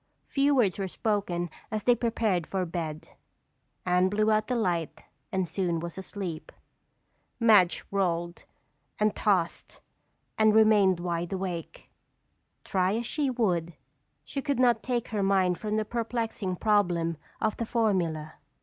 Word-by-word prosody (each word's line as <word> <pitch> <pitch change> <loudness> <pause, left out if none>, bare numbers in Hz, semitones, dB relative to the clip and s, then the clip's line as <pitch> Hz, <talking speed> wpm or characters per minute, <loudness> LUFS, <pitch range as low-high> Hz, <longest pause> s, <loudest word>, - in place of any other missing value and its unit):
Few 280 +1 +2
words 210 -8 +2
were 195 - -1
spoken 185 -4 -2 0.2
as 215 -1 -3
they 245 - +5
prepared 220 -7 0
for 190 -2 -1
bed. 165 -3 -5 0.8
Anne 180 +1 +3
blew 215 +2 +2
out 215 0 +2
the 250 - 0
light 175 -8 -1 0.3
and 190 -2 0
soon 170 0 -1
was 170 0 -6
asleep. 190 -3 -6 0.9
Madge 210 -7 +5
rolled 175 -3 -1 0.5
and 210 -1 +1
tossed 185 -6 0 0.6
and 215 0 +5
remained 210 -4 +5
wide 175 -1 -3
awake. 185 -3 -5 0.7
Try 190 +1 +1
as 235 +1 -2
she 285 +3 -1
would, 180 -9 0 0.5
she 275 - -4
could 280 -2 -1
not 240 -3 +4
take 245 -3 -2
her 210 -2 -1
mind 190 -2 +2
from 215 0 -2
the 215 - 0
perplexing 225 -4 -2
problem 175 -6 +1 0.2
of 220 -1 0
the 230 - -2
formula. 175 -10 0
195 Hz, 140 wpm, -28 LUFS, 175-220 Hz, 0.9 s, they